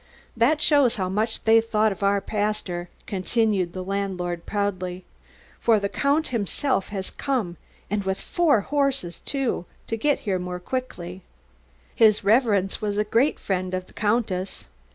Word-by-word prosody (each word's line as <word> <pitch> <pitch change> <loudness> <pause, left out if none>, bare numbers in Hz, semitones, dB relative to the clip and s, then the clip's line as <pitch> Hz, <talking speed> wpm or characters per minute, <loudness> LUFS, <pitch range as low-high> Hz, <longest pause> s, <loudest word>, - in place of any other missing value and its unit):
"That 250 +7 +3
shows 285 -6 +4
how 185 -2 -1
much 215 +4 -1
they 225 0 +6
thought 220 -1 +2
of 195 - -7
our 200 0 +2
pastor," 205 -4 -2 0.2
continued 195 -2 0
the 185 - -4
landlord 185 -3 -3
proudly. 185 -3 -2 0.5
"For 225 -2 +4
the 200 0 -2
Count 290 +6 +1
himself 235 0 -1
has 195 -2 -4
come 230 - -2 0.3
and 205 0 -1
with 190 0 -1
four 315 - +2
horses, 275 -9 0
too, 270 -10 -2 0.2
to 225 - -2
get 285 +6 +1
here 190 -4 -1
the - - -4
more 180 0 -4
quickly. 185 -5 -5 0.7
His 220 -4 +4
Reverence 205 -3 +3
was 205 -1 -1
a 210 - +3
great 230 +7 +2
friend 185 -1 -2
of 185 0 -4
the - - -20
Countess." 205 -3 -1
205 Hz, 155 wpm, -24 LUFS, 185-230 Hz, 0.7 s, they